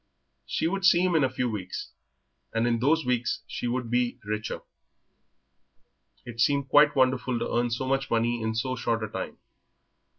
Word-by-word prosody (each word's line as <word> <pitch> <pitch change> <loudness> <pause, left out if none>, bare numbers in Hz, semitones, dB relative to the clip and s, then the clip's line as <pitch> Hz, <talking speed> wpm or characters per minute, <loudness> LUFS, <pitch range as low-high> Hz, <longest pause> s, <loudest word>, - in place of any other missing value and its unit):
She - - -1
would 195 +2 -2
see 175 -2 +6
him 185 -1 +2
in 160 -3 +4
a 130 - +3
few 125 - -1
weeks, 100 -5 -5 0.6
and 115 +1 +2
in 115 -1 +1
those 155 +5 +2
weeks 125 -1 0
she - - -4
would 120 -1 -2
be 120 0 +1
richer. 105 +1 -3 1.6
It 115 -1 -9
seemed 140 +1 +2
quite 145 +2 +6
wonderful 130 -1 +2
to 115 - -3
earn 120 0 +2
so 120 +3 -2
much 135 +1 0
money 115 +1 +1
in 110 0 -2
so 130 +3 -1
short 115 -2 -1
a - - -2
time. - - -6
125 Hz, 175 wpm, -27 LUFS, 115-135 Hz, 1.6 s, see